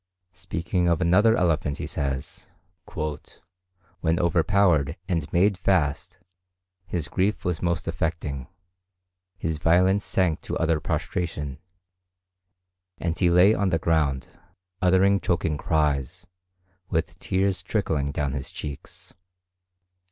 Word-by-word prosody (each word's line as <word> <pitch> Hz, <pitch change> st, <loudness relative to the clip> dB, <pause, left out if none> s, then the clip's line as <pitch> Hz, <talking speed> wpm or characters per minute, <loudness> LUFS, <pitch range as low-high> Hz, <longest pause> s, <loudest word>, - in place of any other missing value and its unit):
Speaking 85 Hz, 0 st, -2 dB
of 85 Hz, -2 st, +2 dB
another 100 Hz, +6 st, +4 dB
elephant 80 Hz, -6 st, +1 dB
he -, -, -4 dB
says, 70 Hz, -1 st, -4 dB, 1.5 s
"When 80 Hz, -1 st, +1 dB
overpowered 85 Hz, -3 st, +2 dB
and 85 Hz, -5 st, -2 dB
made 95 Hz, +2 st, +3 dB
fast, 85 Hz, -5 st, 0 dB, 0.7 s
his 85 Hz, -4 st, -3 dB
grief 95 Hz, +4 st, -1 dB
was 90 Hz, -3 st, -1 dB
most 85 Hz, -2 st, -1 dB
affecting; 75 Hz, -4 st, -3 dB, 0.9 s
his 80 Hz, -4 st, -3 dB
violence 95 Hz, +5 st, +3 dB
sank 90 Hz, -5 st, 0 dB
to -, -, -3 dB
utter 80 Hz, -1 st, +1 dB
prostration, 75 Hz, -5 st, -3 dB, 1.4 s
and 85 Hz, -1 st, -2 dB
he 90 Hz, -2 st, +2 dB
lay 90 Hz, +4 st, +6 dB
on 100 Hz, -3 st, +1 dB
the 85 Hz, -, +2 dB
ground, 75 Hz, -5 st, 0 dB, 0.5 s
uttering 95 Hz, +2 st, +4 dB
choking 85 Hz, -4 st, 0 dB
cries, 75 Hz, +2 st, -1 dB, 0.6 s
with 80 Hz, +1 st, -2 dB
tears 95 Hz, 0 st, 0 dB
trickling 75 Hz, -9 st, -1 dB
down 70 Hz, -2 st, -1 dB
his 70 Hz, -1 st, -4 dB
cheeks." 70 Hz, -2 st, -8 dB
85 Hz, 110 wpm, -25 LUFS, 75-90 Hz, 1.5 s, lay